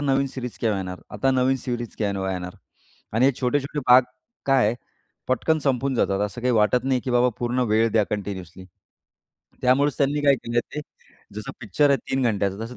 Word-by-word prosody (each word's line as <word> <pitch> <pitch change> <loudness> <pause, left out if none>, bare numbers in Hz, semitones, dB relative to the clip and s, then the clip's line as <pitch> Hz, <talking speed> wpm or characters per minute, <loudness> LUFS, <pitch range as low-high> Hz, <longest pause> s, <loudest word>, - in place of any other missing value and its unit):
नवीन 140 -1 +1
series 125 -2 -5
केव्हा 110 -4 +1
येणार? 90 -1 -6
आता 135 - 0
नवीन 130 +1 +2
सीरीज 120 -2 -5
केव्हा 100 -3 -1
येणार? 90 -1 -5 0.6
आणि 120 +4 +3
हे 140 - +4
छोटे-छोटे 140 +3 -1
भाग 125 +1 +8 0.4
काय 135 -5 +4
आहे 110 - +1 0.5
पटकन 155 +5 +1
संपून 135 -2 0
जातात. 100 -4 +1
असं 110 +4 -9
काही 125 +1 +1
वाटत 115 +3 +3
नाही, 130 -2 +1
की 125 - -4
बाबा 125 +1 +4
पूर्ण 120 +1 -1
वेळ 110 +2 +3
द्या 110 -2 +3
कन्टिन्यूअसली. 95 -3 -5
तर 90 - -32
त्यामुळेच 140 +3 +3
त्यांनी 145 +1 +1
काय 140 -1 +5
केलंय 120 0 -1
ते, 150 - -2 0.5
जसं 105 0 -6
पिक्चर 125 +7 +2
आहे 140 - +5
3 135 0 +1
घंट्याचं 100 -3 0
तसं 125 +2 -9
125 Hz, 190 wpm, -24 LUFS, 105-135 Hz, 0.6 s, भाग